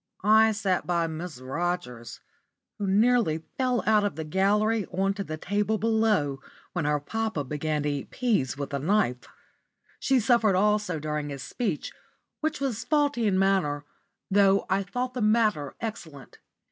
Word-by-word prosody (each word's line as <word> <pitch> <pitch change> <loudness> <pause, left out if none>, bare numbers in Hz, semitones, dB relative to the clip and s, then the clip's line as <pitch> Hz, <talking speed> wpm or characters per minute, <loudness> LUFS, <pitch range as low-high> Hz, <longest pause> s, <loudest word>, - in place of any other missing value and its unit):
I 220 +2 +6
sat 195 -4 -1
by 170 -1 +1
Miss 160 -3 -6
Rogers, 130 -3 -4 0.6
who 200 - -1
nearly 205 -5 +3 0.2
fell 255 -2 +1
out 215 -1 +4
of 205 -7 -1
the 160 - -4
gallery 205 +6 +1
on 195 +2 0
to 200 0 -4
the 155 -4 -6
table 205 +5 0
below 215 -11 +1 0.3
when 175 -4 -1
her 150 0 +1
papa 220 +1 -2
began 150 +2 -2
to 150 - 0
eat 145 -2 -4
peas 205 - 0
with 140 0 -5
a 140 - 0
knife. 155 - 0 0.7
She 265 -1 +2
suffered 225 -3 +3
also 210 -2 +1
during 150 -1 -3
his 140 -1 -6
speech, 180 +2 -3 0.5
which 315 -1 -2
was 255 -5 -2
faulty 290 -7 +1
in 190 -2 +2
manner, 185 -7 +1 0.5
though 195 0 +4
I 195 +1 +3
thought 250 +6 -3
the 250 - -3
matter 215 -10 +2
excellent. 160 - -7
195 Hz, 160 wpm, -27 LUFS, 150-220 Hz, 0.7 s, I